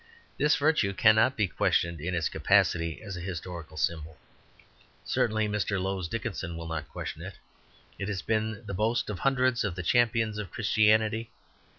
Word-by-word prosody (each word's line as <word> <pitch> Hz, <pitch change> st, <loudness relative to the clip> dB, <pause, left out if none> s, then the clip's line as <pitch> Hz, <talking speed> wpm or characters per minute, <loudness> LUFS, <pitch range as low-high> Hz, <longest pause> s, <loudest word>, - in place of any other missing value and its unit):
This 150 Hz, +2 st, +4 dB
virtue 145 Hz, -10 st, +2 dB
cannot 110 Hz, +5 st, +4 dB
be 105 Hz, -3 st, +2 dB
questioned 85 Hz, -2 st, 0 dB
in 90 Hz, +3 st, -2 dB
its 85 Hz, -2 st, +1 dB
capacity 85 Hz, +2 st, +1 dB
as 100 Hz, -3 st, -6 dB
a -, -, -6 dB
historical 85 Hz, -3 st, -6 dB
symbol; 80 Hz, -1 st, -2 dB, 0.9 s
certainly 110 Hz, -1 st, +1 dB
Mr. 105 Hz, -1 st, -1 dB
Lowes 95 Hz, -1 st, -2 dB
Dickinson 90 Hz, -5 st, -4 dB
will 85 Hz, -, -6 dB
not 80 Hz, -1 st, -4 dB
question -, -, -6 dB
it. -, -, -7 dB, 0.6 s
It 100 Hz, -, -3 dB
has 100 Hz, -3 st, -3 dB
been 110 Hz, 0 st, -1 dB
the 100 Hz, -, -5 dB
boast 110 Hz, +3 st, 0 dB
of 100 Hz, -, -6 dB
hundreds 130 Hz, -2 st, +2 dB
of 100 Hz, -5 st, -2 dB
the 90 Hz, -, -4 dB
champions 115 Hz, 0 st, +2 dB
of 105 Hz, -, -5 dB
Christianity. 110 Hz, +1 st, +2 dB
105 Hz, 165 wpm, -28 LUFS, 85-110 Hz, 0.9 s, This